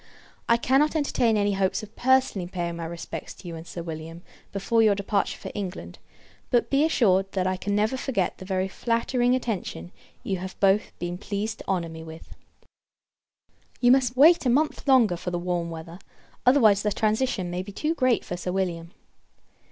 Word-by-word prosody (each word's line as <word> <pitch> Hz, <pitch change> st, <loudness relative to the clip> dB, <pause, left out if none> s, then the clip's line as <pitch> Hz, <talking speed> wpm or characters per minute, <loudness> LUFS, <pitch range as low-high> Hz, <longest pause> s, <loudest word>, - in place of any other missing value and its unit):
I 235 Hz, -, +5 dB
cannot 270 Hz, +6 st, +2 dB
entertain 245 Hz, -7 st, +2 dB
any 205 Hz, 0 st, +1 dB
hopes 195 Hz, +1 st, 0 dB
of 215 Hz, +1 st, -12 dB
personally 260 Hz, -8 st, +2 dB
paying 175 Hz, -2 st, -4 dB
my 165 Hz, -, -5 dB
respects 170 Hz, 0 st, -7 dB
to 180 Hz, -, -12 dB
you 170 Hz, -, -6 dB
and 165 Hz, +1 st, -9 dB
Sir 170 Hz, -, -6 dB
William, 165 Hz, +1 st, -7 dB, 0.3 s
before 200 Hz, +4 st, +1 dB
your 215 Hz, -2 st, +4 dB
departure 200 Hz, 0 st, -1 dB
for -, -, -8 dB
England; 180 Hz, -, -6 dB, 0.5 s
but, 240 Hz, -, +1 dB
be 275 Hz, +2 st, +4 dB
assured, 195 Hz, -, +2 dB
that 185 Hz, -2 st, 0 dB
I 185 Hz, 0 st, +1 dB
can 200 Hz, +2 st, -2 dB
never 215 Hz, +5 st, +1 dB
forget 235 Hz, -9 st, -2 dB
the 185 Hz, -, -8 dB
very 190 Hz, 0 st, -1 dB
flattering 240 Hz, +4 st, 0 dB
attention 200 Hz, -, -4 dB, 0.3 s
you 195 Hz, -, -2 dB
have 190 Hz, +1 st, -8 dB
both 195 Hz, +1 st, +3 dB
been 175 Hz, 0 st, -4 dB
pleased 210 Hz, +2 st, -3 dB
to -, -, -11 dB
honour 180 Hz, -3 st, 0 dB
me 160 Hz, 0 st, -9 dB
with. 160 Hz, 0 st, -11 dB, 1.5 s
You 245 Hz, -1 st, +5 dB
must 255 Hz, -1 st, +3 dB
wait 325 Hz, +5 st, +7 dB
a 255 Hz, -, +1 dB
month 295 Hz, +4 st, +1 dB
longer, 235 Hz, -9 st, +4 dB
for 180 Hz, -, -4 dB
the 175 Hz, -, -2 dB
warm 175 Hz, -1 st, -2 dB
weather; 165 Hz, +2 st, -8 dB, 0.5 s
otherwise, 220 Hz, -7 st, +5 dB
the 210 Hz, -, 0 dB
transition 215 Hz, -3 st, 0 dB
may 180 Hz, +1 st, -2 dB
be 195 Hz, +2 st, -8 dB
too 305 Hz, +10 st, -1 dB
great 255 Hz, -7 st, +1 dB
for 180 Hz, -, -4 dB
Sir 180 Hz, +1 st, -4 dB
William. 175 Hz, -3 st, -3 dB
200 Hz, 185 wpm, -25 LUFS, 175-240 Hz, 1.5 s, wait